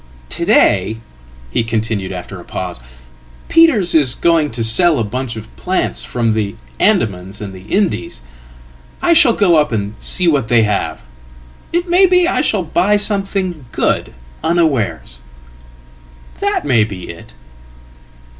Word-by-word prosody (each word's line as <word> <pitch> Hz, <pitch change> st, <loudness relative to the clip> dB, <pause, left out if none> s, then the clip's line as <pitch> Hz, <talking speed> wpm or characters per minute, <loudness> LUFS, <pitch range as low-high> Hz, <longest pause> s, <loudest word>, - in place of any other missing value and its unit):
"To -, -, -3 dB
day," 110 Hz, -, +3 dB, 0.5 s
he 115 Hz, -, 0 dB
continued, 110 Hz, -4 st, -2 dB
after 90 Hz, +1 st, -8 dB
a -, -, -11 dB
pause, 90 Hz, -3 st, -6 dB, 0.7 s
"Peters' 275 Hz, -, +4 dB
are 140 Hz, -7 st, +4 dB
going 165 Hz, -3 st, +2 dB
to 115 Hz, -2 st, -4 dB
sell 155 Hz, +9 st, +4 dB
a 115 Hz, -, 0 dB
batchof 115 Hz, 0 st, -5 dB
plants 185 Hz, +1 st, -1 dB
from 115 Hz, -3 st, -1 dB
the 105 Hz, -1 st, -2 dB, 0.2 s
Andamans 105 Hz, -, 0 dB
and 100 Hz, -2 st, -7 dB
the 95 Hz, -, -11 dB
Indies. 140 Hz, -, -1 dB, 0.8 s
I 340 Hz, -, +3 dB
shall 305 Hz, -8 st, +5 dB
go 180 Hz, -7 st, +3 dB
up 150 Hz, -3 st, +2 dB
and 105 Hz, -2 st, -2 dB
see 180 Hz, -2 st, 0 dB
whatthey 120 Hz, -7 st, +2 dB
have. 105 Hz, -2 st, -2 dB, 0.7 s
It 345 Hz, +1 st, -1 dB
may 360 Hz, +2 st, +5 dB
be 360 Hz, -1 st, +3 dB
I -, -, +1 dB
shall 210 Hz, -10 st, 0 dB
buy 185 Hz, +5 st, +1 dB
something 195 Hz, -, -2 dB
good -, -, -1 dB, 0.3 s
unawares. 155 Hz, -, 0 dB, 1.2 s
That -, -, -1 dB
may 120 Hz, -6 st, +3 dB
be 100 Hz, -4 st, -7 dB
it." -, -, -14 dB
135 Hz, 135 wpm, -16 LUFS, -, 1.2 s, shall